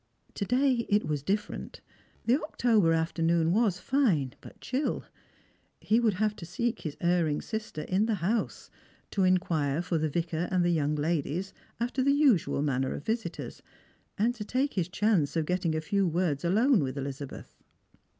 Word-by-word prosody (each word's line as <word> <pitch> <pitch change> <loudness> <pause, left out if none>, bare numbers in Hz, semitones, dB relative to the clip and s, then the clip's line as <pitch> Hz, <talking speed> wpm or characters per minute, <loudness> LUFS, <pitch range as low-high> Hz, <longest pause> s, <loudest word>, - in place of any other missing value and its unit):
To 200 - -3
day 250 0 +2
it 205 -3 +3
was 150 -1 -1
different. 200 +8 -3 0.5
The 250 +6 +3
October 225 - +2
afternoon 165 0 +1
was 210 -4 +2
fine, 180 - +1
but - - -13
chill. 265 +4 -2 0.8
He 220 +2 +2
would 225 -5 +2
have 215 +2 0
to - - -9
seek 235 +7 -2
his 155 -3 -5
erring 170 -4 +1
sister 220 -8 -5
in 195 +4 +1
the 225 - +1
house, 205 +5 -2 0.4
to 200 - 0
inquire 165 -6 +1
for 170 -2 -1
the 155 0 0
Vicar 165 +2 -2
and 180 -2 +2
the 175 - +3
young 150 -2 +1
ladies 160 +4 -1 0.3
alter 245 +3 -1
the 280 +2 +4
usual 260 - +3
manner 130 -2 0
of - - -8
visitors, 225 +1 -3 0.6
and 230 +4 +2
to 230 -4 -6
take 260 +6 -1
his 180 -3 -1
chance 180 -7 +1
of 160 -2 +1
getting 180 -2 0
a 155 - -1
few 195 +4 +1
words 165 -3 0
alone 220 +8 +4
with 135 0 -3
Elizabeth. 140 0 -6
180 Hz, 170 wpm, -29 LUFS, 160-225 Hz, 0.8 s, the